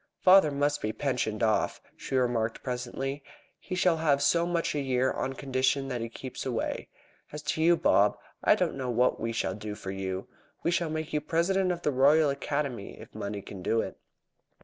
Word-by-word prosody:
"Father 185 -4 +7
must 145 +1 0
be 110 - -1
pensioned 120 -5 -1
off," 110 -1 +1 0.2
she - - -5
remarked 120 -3 0
presently. 130 +3 -3 0.4
"He 185 - -5
shall 180 -2 +3
have 150 -3 +2
so 170 +4 +3
much 170 -1 0
a 150 - -1
year 130 -1 +1
on 135 - -2
condition 135 +1 0
that 125 -2 -3
he 115 - -3
keeps 130 +2 -7
away. 120 -4 -2 0.4
As 150 0 -7
to 150 +1 -1
you, 170 +1 +5
Bob, 105 -7 +3 0.3
I - - +6
don't - - 0
know 130 -2 -3
what 125 +1 +2
we 115 +1 -2
shall 105 -4 -1
do 105 +1 -6
for 95 - -6
you. 95 -1 -4 0.4
We 170 - +2
shall 170 -1 0
make 155 0 -4
you 150 - +1
President 180 +5 +1
of 175 -1 -4
the 150 - +2
Royal 145 +3 +5
Academy 140 -5 -3
if - - -12
money 100 0 -5
can 95 - -9
do 115 +5 +1
it." - - -6
135 Hz, 195 wpm, -29 LUFS, 115-155 Hz, 0.4 s, Father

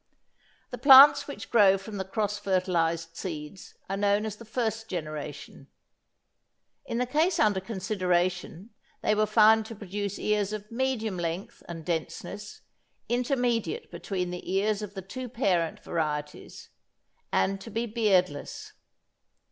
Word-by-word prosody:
The - - -6
plants 275 0 +9
which 285 - -8
grow 200 -4 +6
from 200 +2 -8
the 190 - -2
cross 210 +1 -2
fertilised 170 -4 0
seeds 160 0 -7
are 195 - -2
known 205 +1 +1
as 210 -1 -5
the 230 - -12
first 225 0 -2
generation. 155 -4 -6 1.2
In 235 - -2
the 250 - +1
case 320 +7 +1
under 205 -6 +3
consideration, 185 -1 -2 0.3
they - - +3
were 215 0 +2
found 220 0 +5
to 225 - -8
produce 205 0 -4
ears 210 -1 0
of 210 0 -7
medium 230 -5 -1
length 170 +2 -4
and 165 -2 -7
denseness, 180 +4 -5 0.5
intermediate 250 - -1
between 180 -3 -3
the 180 0 -6
ears 205 +2 +1
of 205 -1 -7
the 190 - -6
two 250 +6 -7
parent 180 -9 0
varieties, 150 -3 -4 0.6
and 195 0 +1
to 230 - -9
be 230 +2 -2
beardless. 195 -9 0
205 Hz, 135 wpm, -28 LUFS, 180-225 Hz, 1.2 s, plants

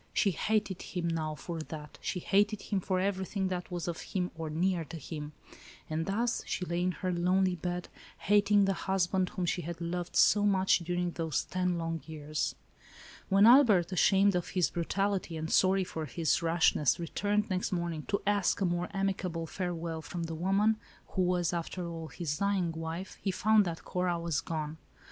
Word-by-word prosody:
She 205 -2 +3
hated 205 +1 -1
him 175 -2 -3
now 160 -2 -1
for 165 +2 -6
that; 155 -1 -8
she 180 - -2
hated 205 +3 +2
him 200 - -1
for 185 0 -1
everything 190 0 -1
that 180 -1 -4
was 175 -1 -4
of 170 -2 -3
him 180 -2 -2
or 160 -1 -4
near 175 +2 0
to 165 - -8
him. 150 0 -7 0.6
And 160 +1 -1
thus' 230 +5 0
she 180 - -2
lay 170 0 -1
in 180 +1 +1
her 185 - +1
lonely 180 +1 +2
bed, 175 +1 -3 0.3
hating 205 0 +4
the 195 - +2
husband, 190 0 0
whom 180 - -3
she 175 - 0
had 170 0 -6
loved 175 +1 -4
so 205 0 +5
much 190 -2 +3
during 175 +1 -1
those 160 -4 -1
ten 180 -1 -1
long 165 -1 -3
years. 155 -1 -3 0.7
When 195 +2 +6
Albert, 220 -8 +6
ashamed 195 +2 +4
of 180 -1 -1
his 180 -3 +1
brutality, 190 0 -1
and 160 +1 -4
sorry 190 0 +4
for 160 -3 -5
his 165 +3 +1
rashness, 165 -4 +3
returned 205 +5 0
next 185 0 -1
morning 170 -3 -2
to 200 - -1
ask 205 -2 +2
a 195 - +1
more 175 0 0
amicable 190 -4 -1
farewell 170 -2 -4
from 170 +3 -5
the 165 0 -4
woman, 195 +6 +2 0.3
who 190 - -1
was, 180 -1 +1
after 170 +1 -3
all, 165 -1 -6
his 150 -1 -4
dying 200 -4 +1
wife, 165 +3 -6
he 200 - -1
found 210 +2 +4
that 165 -2 -5
Cora 180 -1 0
was 170 -3 -1
gone. 155 -1 -4
180 Hz, 185 wpm, -31 LUFS, 165-195 Hz, 0.7 s, When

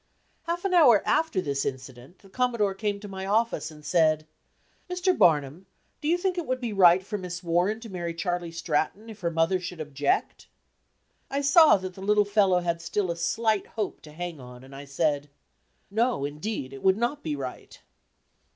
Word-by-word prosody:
Half 345 +2 -2
an 385 - 0
hour 265 - +6
after 320 -12 +1
this 140 -4 -2
incident, 130 +3 -7
the 195 - -17
Commodore 235 -3 0
came 205 0 -2
to 210 - -8
my 190 -1 -6
office, 220 -5 0
and 150 -1 -14
said: 155 -3 +2 0.6
"Mr. 360 +1 +1
Barnum, 150 +2 +2 0.3
do 300 - -3
you 340 +3 +3
think 365 0 -1
it 335 - -5
would 255 0 -1
be 235 -4 -3
right 185 -1 +5
for 210 0 -4
Miss 180 0 -6
Warren 175 +6 +1
to 230 - -8
marry 170 -2 -4
Charley 175 -1 -2
Stratton 165 +6 -2
if 215 - -12
her 170 - -1
mother 165 +3 +1
should 180 -1 -7
object?" 145 -2 -1 0.8
I 280 +1 -1
saw 305 - +6
that 185 -1 -6
the 190 - -12
little 210 +1 +3
fellow 200 -3 +3
had 170 -1 -2
still 185 +1 -1
a - - -3
slight 220 +4 0
hope 215 -3 -4
to 150 - -13
hang 170 0 -6
on, 125 0 -12
and 135 +1 -13
I 140 +1 -9
said: 145 +1 -1 0.6
"No, 230 - +1
indeed, 150 -2 -5
it 135 - -9
would 190 +1 +3
not 240 +6 -1
be 155 -2 -3
right." 130 -3 -8
185 Hz, 190 wpm, -26 LUFS, 155-220 Hz, 0.8 s, hour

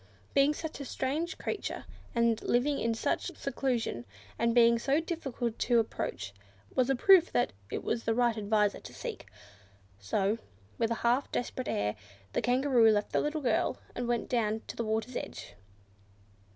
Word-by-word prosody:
Being 280 +2 +4
such 320 -1 -6
a 280 - -5
strange 295 +8 -2
creature, 420 - -4 0.3
and 235 -1 +2
living 275 +4 +1
in 230 0 0
such - - -2
seclusion, 235 - -1 0.4
and 235 0 +2
being 235 -1 +6
so 275 +5 +2
difficult 270 -9 -3
to 240 -1 +3
approach 105 - -2 0.4
was 255 0 +2
a 270 - +3
proof 365 +6 +6
that 245 - +1 0.2
it - - -4
was 230 0 -1
the 225 - +1
right 240 -1 +3
adviser 210 -1 +1
to - - -11
seek. - - -6 0.7
So, 195 - 0 0.4
with 230 - +2
a 230 - 0
half 245 +4 +2
desperate 255 +1 -3
air, 105 0 0 0.4
the - - +1
Kangaroo 245 -1 +4
left 210 -1 +1
the - - +2
little 300 +1 -1
girl, 255 - +1 0.2
and 245 -1 -3
went 240 -1 0
down 220 -2 0
to - - -5
the 235 - -2
water's 220 +2 -2
edge. - - -6
240 Hz, 165 wpm, -31 LUFS, 225-270 Hz, 0.7 s, being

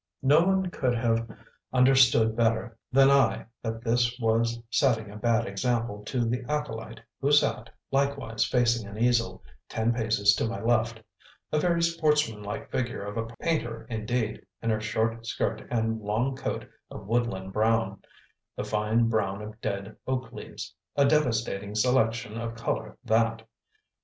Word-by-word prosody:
No 145 +4 +6
one 190 -1 +1
could 125 -6 0
have 115 0 0 0.4
understood 125 -3 +5
better 115 0 +1 0.2
than 135 +1 +6
I 125 -5 +3 0.2
that 115 0 -4
this 120 +1 +1
was 115 0 +1
setting 115 -6 +2
a - - -10
bad 115 +2 +1
example 115 +1 -1
to 120 +1 -1
the 125 +2 -1
acolyte 115 -7 -3 0.2
who 140 +1 +1
sat, 145 -5 +3 0.2
likewise 135 -5 0
facing 120 -3 +1
an 100 +1 -9
easel, 120 0 +1 0.3
ten 115 +1 +1
paces 110 -3 +3
to - - 0
my 115 - -4
left; 115 -1 +1 0.5
a 155 - +2
very 170 +1 +2
sportsmanlike 150 -8 0
figure 120 -5 -2
of 105 +1 -6
a 115 0 -2 0.2
painter 120 -9 -1
indeed, 110 0 -2 0.2
in 115 - -1
her 110 0 0
short 115 +1 -1
skirt - - -1
and 115 -1 0
long 115 +6 0
coat 130 - -4 0.2
of 105 - -9
woodland 100 -4 -1
brown, 110 -2 +1 0.5
the - - -3
fine 110 +2 +1
brown 105 -2 -1
of 110 +1 -10
dead 100 +1 -3
oak 130 0 -2
leaves; - - -8 0.2
a 140 - +4
"devastating" 115 -8 +1
selection 115 -1 +1
of 115 0 -4
colour 110 -1 -3
that! 115 -1 +1
115 Hz, 150 wpm, -27 LUFS, 110-125 Hz, 0.5 s, No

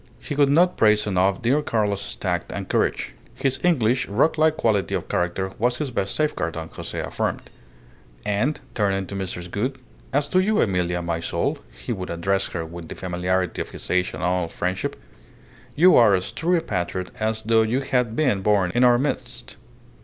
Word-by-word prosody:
He - - -5
could 145 -1 +3
not 175 +5 +4
praise 105 -1 +4
enough 95 0 +1
dear 135 +6 +3
Carlos's 105 -7 -1
tact - - -2
and - - -5
courage. - - 0 0.2
His 130 -1 0
English, 125 -8 +2
rock 105 +11 +2
like 155 0 +3
quality 105 -5 +1
of - - -3
character 90 +2 -1
was 120 +2 +1
his 145 -4 -3
best 100 -4 -2
safeguard, 150 - -1
Don 80 0 -5
Jose - - -6
affirmed; - - -2 0.8
and, 115 +9 0
turning 100 -2 0
to 100 - -7
Mrs. 90 -2 -4
Gould, 125 +6 -2 0.3
"As 145 +1 +1
to 185 - +3
you, 210 +3 +2
Emilia, 90 -4 +1
my 85 -1 -1
soul" 85 - -1
he - - -5
would 90 -1 -5
address 95 +3 0
her 80 - -4
with 85 0 -9
the - - -7
familiarity 90 0 -1
of - - -5
his - - -7
age 90 0 +1
and - - -6
old 90 -2 0
friendship 90 +1 -2 0.8
"you 180 +4 +6
are 110 -5 +6
as 90 - -2
true 175 +2 +1
a - - 0
patriot 90 - -3
as 110 0 -1
though 115 0 +4
you 115 +5 +1
had 125 -4 0
been 130 -10 +2
born 100 -3 +2
in 120 - +3
our 120 -1 +6
midst." 140 +3 -3
105 Hz, 190 wpm, -23 LUFS, 90-130 Hz, 0.8 s, you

